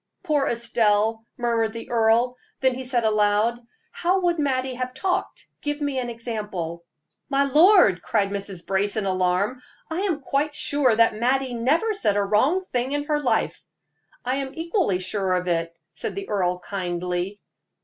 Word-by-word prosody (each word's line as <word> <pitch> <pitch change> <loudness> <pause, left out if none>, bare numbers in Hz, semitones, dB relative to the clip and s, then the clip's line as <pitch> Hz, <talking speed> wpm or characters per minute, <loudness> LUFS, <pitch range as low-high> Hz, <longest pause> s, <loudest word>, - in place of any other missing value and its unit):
"Poor 300 -6 +1
Estelle!" 225 -1 +1
murmured 230 -2 0
the 230 +1 -8
earl; 235 +2 +3 0.2
then 260 -1 +2
he 260 +1 -5
said 245 -2 0
aloud: 215 +2 +2 0.3
"How 365 +2 +1
would 345 -2 +1
Mattie 260 -3 0
have 255 0 -4
talked? 365 +7 -2
Give 290 0 -2
me 285 -3 -1
an 245 -1 -3
example." 210 -8 -5 0.5
"My 275 0 +3
lord!" 295 - +5
cried 200 -3 0
Mrs. 195 -3 -4
Brace, 200 +2 0
in 210 - 0
alarm, 185 +6 0 0.3
"I 320 - -1
am 375 -6 0
quite 290 +2 -1
sure 275 -5 +2
that 230 0 +4
Mattie 255 +2 +1
never 300 - +1
said 210 - +1
a 205 - +2
wrong 260 - +2
thing 255 -3 -2
in 290 0 0
her 295 0 0
life." 260 - 0 0.6
"I 255 +2 0
am 270 -1 -4
equally 335 - 0
sure 185 0 -1
of 180 0 -2
it," 165 -1 -1 0.2
said - - -4
the 395 0 -6
earl, 180 -3 0
kindly. 180 +1 -3
235 Hz, 165 wpm, -24 LUFS, 200-280 Hz, 0.6 s, lord